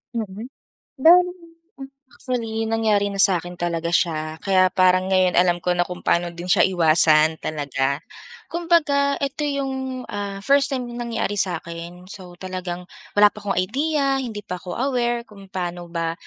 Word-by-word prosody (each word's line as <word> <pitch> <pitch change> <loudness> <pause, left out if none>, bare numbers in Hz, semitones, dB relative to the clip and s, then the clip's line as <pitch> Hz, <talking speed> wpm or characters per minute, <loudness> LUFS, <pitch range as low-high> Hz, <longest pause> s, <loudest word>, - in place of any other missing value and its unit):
Mm. 215 +1 -5 0.5
Bale 355 +3 +6 0.5
m 270 - -8 0.2
actually, 225 -3 -3
nangyari 215 -3 +2
na 200 - -6
sa'kin 175 -2 +1
talaga 170 -1 -2
siya, 155 -2 0
kaya 185 -1 +4
parang 185 0 +3
ngayon 185 -1 +3
alam 175 0 +3
ko 180 - +1
na 175 - +1
kung 180 0 -8
paano 175 0 +2
din 170 +1 -9
siya 180 - +3
iwasan 160 -3 +4
talaga. 140 -2 -2 0.5
Kumbaga 310 -5 +2
ito 285 +2 -3
'yung, 265 -2 -3
ah, 200 -1 -5
first 280 +2 +4
time 255 -2 -2
na 240 0 -5
nangyari 205 -3 -2
sa'kin. 170 0 -4
So, 180 -3 -11
talagang 185 -1 -5 0.3
wala 205 0 +6
pa 210 - -11
akong 200 -1 -2
idea, 275 +7 0
hindi 220 -6 -5
pa 180 -1 -5
ko 180 -1 -7
aware 240 -2 0
kung 200 -3 -15
paano 175 -2 -5
ba 165 -1 -2
195 Hz, 160 wpm, -22 LUFS, 175-250 Hz, 0.5 s, Bale